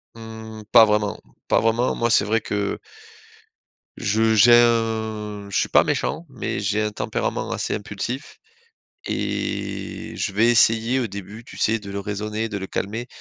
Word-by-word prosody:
Mmh 110 -1 -9
pas 110 - +9
vraiment, 105 0 0 0.3
pas - - +3
vraiment. 115 +3 +1
Moi, 120 - 0
c'est 115 - +4
vrai 110 +2 +1
que 100 0 -2 1.2
je 110 +2 +2
j'ai 120 +3 +7
un 110 -3 +1
je 100 - -1
suis - - +1
pas - - +5
méchant, 160 +3 -2
mais 130 -4 -4
j'ai 105 +1 0
un 105 - -1
tempérament - - -3
assez - - -2
impulsif 110 +7 -5 0.7
et - - -4
je 100 - -2
vais 110 +4 +4
essayer 115 +2 +3
au 125 - 0
début, 100 +2 -9
tu - - -12
sais, 115 +1 +2
de 100 -2 -10
le 100 0 -4
raisonner, 105 +2 -3
de 105 - -5
le 95 -1 -4
calmer 110 +6 -4
110 Hz, 165 wpm, -23 LUFS, 105-115 Hz, 1.2 s, pas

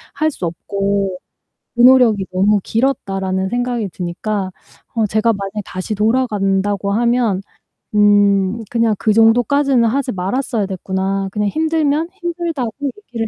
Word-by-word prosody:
할 310 +2 +1
수 190 - -5
없고 195 +2 -2 0.6
그 - - -1
노력이 240 -6 +5
너무 200 +3 +3
길었다.'라는 195 -7 -1
생각이 245 -1 -2
드니까 185 +2 -3 0.4
어 225 -2 +1
제가 220 +3 +1
만약에 200 0 -4
다시 185 +3 -5
돌아간다고 205 -3 0
하면 235 -3 +1 0.6
'음 205 0 +3
그냥 230 -2 +2
그 215 - +2
정도까지는 245 +4 +3
하지 255 +3 0
말았어야 210 +4 -1
됐구나. 190 +1 -2
그냥 210 -1 -1
힘들면 315 +2 0
힘들다고 340 - -3
얘기를 255 - -4
215 Hz, 300 characters per minute, -18 LUFS, 195-250 Hz, 0.6 s, 노력이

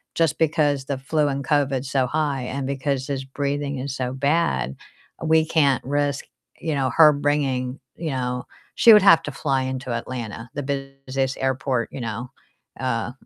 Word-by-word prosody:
just 165 -4 +2
because 150 -4 +1
the 140 0 -2
flu 150 +3 0
and 140 0 -2
COVID's 140 -2 0
so 135 -2 +2
high 145 -1 -1
and 135 +2 -3
because 135 -1 -2
his 135 -2 -3
breathing 140 0 -2
is 135 +1 -4
so 125 -1 -3
bad, 135 - 0 0.5
we 160 0 +4
can't 145 -5 +2
risk, 145 +1 -1 0.3
you 160 -2 -2
know, 135 -2 +1
her 155 +1 +7
bringing 140 -3 -1 0.2
You 160 -2 -4
know, 125 -1 -2 0.3
she 230 - +8
would 210 - +8
have 165 -4 +7
to 145 - -5
fly 135 -1 0
into 130 -1 -4
Atlanta, 115 -1 -5
the 145 - -2 0.4
busiest 130 0 -1
airport, 130 -2 0
you 135 - -6
know, 115 +2 -4 0.5
uh, 120 -3 -1
135 Hz, 170 wpm, -23 LUFS, 130-145 Hz, 0.5 s, she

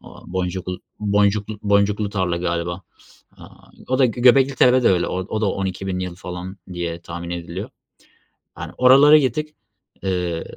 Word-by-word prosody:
Aaa, - - -14
Boncuklu 90 0 -3 0.2
Boncuklu 105 +1 +1
Boncuklu 100 0 +1
tarla 95 -4 -1
galiba. 85 +1 -3 0.5
Aaa, - - -16 0.2
o 130 +1 0
da 130 - +5
Gö 120 +1 -5
Göbeklitepe'de 130 -1 +5
öyle, 90 -2 +2
o 95 +4 -3
da 110 - +1
12.000 95 -1 -3
yıl 90 -1 -4
falan 90 +1 -8 0.2
diye 85 -1 -4
tahmin 85 +1 -7
ediliyor. 85 +3 -6 0.9
Yani, 80 +1 -7
oralara 140 +4 +7
gittik, 150 +3 -1 0.5
eee, 90 -3 -2
95 Hz, 135 wpm, -21 LUFS, 90-110 Hz, 0.9 s, oralara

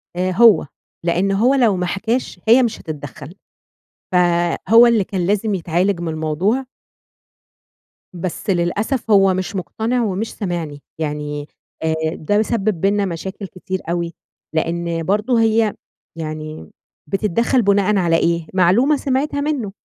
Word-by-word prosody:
آآ، 185 +1 0
هو، 215 -2 +5 0.4
لإن 180 +3 +1
هو 225 +7 +3
لو 235 -7 +3
ما 180 0 -1
حكاش 220 +3 -2
هي 240 +3 +6
مش 235 - -2
هتتدخّل، 145 +1 -8 0.8
ف - - +2 0.5
هو 230 +3 +8
اللي 230 -4 +3
كان 185 -2 -2
لازم 205 +2 +1
يتعالج 175 +1 0
من 170 - -3
الموضوع. 160 - -1 1.5
بس 180 +4 -5
للأسف، 205 +7 0
هو 195 -2 +5
مش 185 +3 -3
مقتنع 220 +8 -1
ومش 210 +1 -2
سامعني، 170 -7 -4 0.2
يعني 150 -1 -4 0.4
آآ، 160 0 +1 0.2
ده 205 +7 +1
سبِّب 215 -5 -1
بيننا 200 +1 +2
مشاكل 190 +3 -5
كتير 185 +1 -5
أوي، 170 0 -2 0.4
لإن 165 +1 -1
برضه 210 +7 +1
هي 220 -1 +2 0.4
يعني 155 - -6 0.4
بتتدخّل 215 - +1
بُناءً 200 0 +2
على 170 -3 +2
إيه؟ 170 -1 0
معلومة 190 - +4
سمعتها 280 +2 -1
منه. 285 -9 -2
190 Hz, 135 wpm, -19 LUFS, 170-220 Hz, 1.5 s, هو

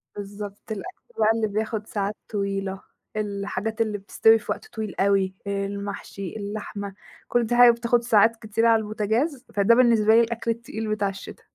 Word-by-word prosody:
بالضبط، 205 +1 -8
الأكل 370 - -8
بقى 215 - +4
اللي 225 -1 0
بياخُد 215 +1 -3
ساعات 205 0 -2
طويلة، 195 -2 -2 0.3
الحاجات 210 +1 -3
اللي 215 -2 0
بتستوي 225 +3 +4
في - - -5
وقت - - -5
طويل 220 -3 -6
أوي، 195 -1 +2
المحشي، 200 -1 -4
اللحمة، 205 -1 -5 0.3
كل 240 -1 +2
دي 240 - 0
حاجة 245 0 +9
بتاخُد 235 0 +1
ساعات 230 -1 +4
كتيرة 225 +1 0
على 225 -1 +5
البوتاجاز، 220 +7 -1
فده 205 +3 +4
بالنسبة 225 -3 +5
لي 235 - +7
الأكل 230 0 -1
التقيل 225 -1 -5
بتاع 200 -2 0
الشِتا. 195 0 -10
215 Hz, 160 wpm, -24 LUFS, 200-230 Hz, 0.3 s, حاجة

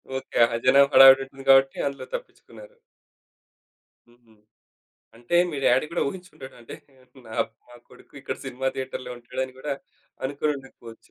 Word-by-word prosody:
Okay 130 - -6
ఆహా! 115 0 -3
జనం 140 +2 +6
హడావిడి 135 0 +9
ఉంటుంది 135 0 -13
కాబట్టి 135 0 +5
అందులో 140 0 -6
తప్పిచ్చుకున్నారు. - - -12 1.3
హుహు. 120 -1 -26 0.8
అంటే 120 +8 -2
మీ 150 - -6
డ్యాడీ 130 +4 +3
గూడా 170 - -1
ఉహించుండడు 155 -5 -11
అంటే 115 - -11 0.5
నా 110 - -10 0.3
మా 120 - -16
కొడుకు - - -20
ఇక్కడ - - -5
సినిమా 135 0 -5
థియేటర్‌లో 130 -1 -6
ఉంటాడని 130 +2 -6
గూడా 145 +2 -4 0.5
అనుకోని 145 +2 -1
ఉండకపోవచ్చు. 120 -4 -15
135 Hz, 135 wpm, -24 LUFS, 125-140 Hz, 1.3 s, హడావిడి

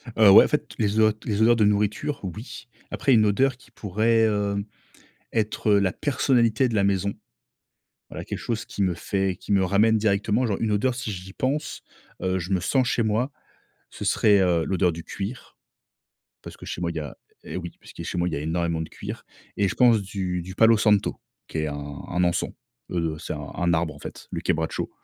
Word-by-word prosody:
Heu, 110 -3 +7
ouais, - - +10
en - - 0
fait, - - -2
les 105 -1 0
odeurs 110 -1 +5
les 105 -1 -1
odeurs 120 +2 +6
de 110 -2 +3
nourriture, 105 +7 0
oui. 105 - -7 0.2
Après, 135 0 +2
une 110 -2 +5
odeur 130 +5 +2
qui 120 -1 -21
pourrait, 110 +2 +1
heu, 100 -2 0 0.7
être 110 -1 0
la 100 -2 +3
personnalité 125 -4 +2
de 115 - -3
la 100 - +3
maison. 100 0 +1 1.0
Voilà - - -7
quelque - - -5
chose 115 -1 -3
qui 100 - -5
me 90 -2 +1
fait 95 +2 -1
qui 95 - -8
me 95 -1 +4
ramène 105 +4 +3
directement, 105 +3 +1
genre, 100 -4 -1
une 110 -2 0
odeur, 120 +5 +1
si 120 -4 -4
j'y 95 0 -8
pense, 145 +6 -2 0.4
heu, 95 0 0
je 90 +2 -6
me 95 - +2
sens 125 +7 +1
chez 120 - +1
moi, 110 +6 0 0.6
ce - - -7
serait, 105 -2 +4
heu, 85 -3 +2
l'odeur 90 -1 +1
du 85 0 -8
cuir, 105 +6 -7 0.9
parce - - -10
que - - -12
chez - - -5
moi, 85 -1 -1
il 85 - -7
y - - -1
a 75 - -7 0.3
et - - -7
oui, 85 -2 -5
puisque - - -10
chez - - -4
moi, 85 +1 +1
il 80 - -3
y - - -2
a - - -3
énormément 80 +1 -1
de 80 - -7
cuir - - -8 0.3
et 100 - +2
je - - -1
pense 120 -4 +4
du 95 -2 -3
du 95 +2 -9
palo 115 +2 +5
santo 105 -2 +2 0.3
qui - - -7
est 80 - -1
un 75 - -5 0.3
un 90 +1 0
encens, 85 -1 +1 0.4
heu, 85 -3 -1
c'est - - -5
un - - -6
un 85 0 +1
arbre, 80 -2 0
en 70 - -13
fait, - - -10
le - - -4
kebracho. 80 0 -1
100 Hz, 215 wpm, -25 LUFS, 90-110 Hz, 1.0 s, ouais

